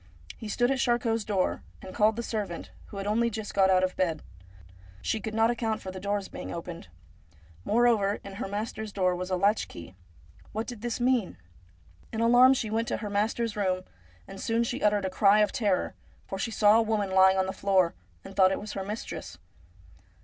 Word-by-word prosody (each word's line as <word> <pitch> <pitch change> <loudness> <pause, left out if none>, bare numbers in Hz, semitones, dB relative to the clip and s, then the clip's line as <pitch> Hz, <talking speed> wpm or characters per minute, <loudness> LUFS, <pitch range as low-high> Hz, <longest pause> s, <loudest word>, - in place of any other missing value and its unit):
He 220 - -8
stood 245 +4 +1
at 270 - 0
Charcot's 235 -3 +1
door, 195 -3 0 0.2
and 185 - -10
called 215 +1 +3
the 235 - -3
servant, 205 -7 -4 0.2
who 200 - -10
had 195 - -4
only 230 +3 +2
just 220 -1 -6
got 190 -1 +4
out 185 -1 +4
of 185 - 0
bed. 165 -5 -1 0.8
She 220 - 0
could 215 +2 -5
not 225 +1 +4
account 225 -2 -1
for 190 - -7
the 185 - -7
doors 200 0 -2
being - - -7
opened. 170 0 -7 0.8
Moreover, 220 -3 +3
in 195 0 -9
her - - -2
master's 215 +1 -4
door 185 -2 +1
was 180 +1 -4
a 185 - +1
latch 200 +4 +2
key. 85 +2 -11 0.6
What 220 +2 -2
did 240 -4 -8
this 240 0 -3
mean? 245 -5 +1 0.7
In 220 - -4
alarm 245 +3 +6
she 220 -4 -3
went 225 +1 0
to - - -1
her 210 -2 -5
master's 220 +2 0
room, 185 -3 0 0.4
and 195 - -9
soon 230 +1 +1
she 245 +3 -3
uttered 205 -2 +2
a - - 0
cry 200 +2 +5
of 210 - +2
terror, 200 -5 0 0.3
for 195 - -6
she 230 - -1
saw 215 0 +5
a - - +4
woman 215 -3 -1
lying 190 0 +5
on 190 - +2
the 190 - -3
floor, 190 -4 +2 0.3
and - - -10
thought 190 -1 +5
it - - -1
was 210 +1 -7
her 195 - -3
mistress. 190 - -6
210 Hz, 210 wpm, -28 LUFS, 190-225 Hz, 0.8 s, alarm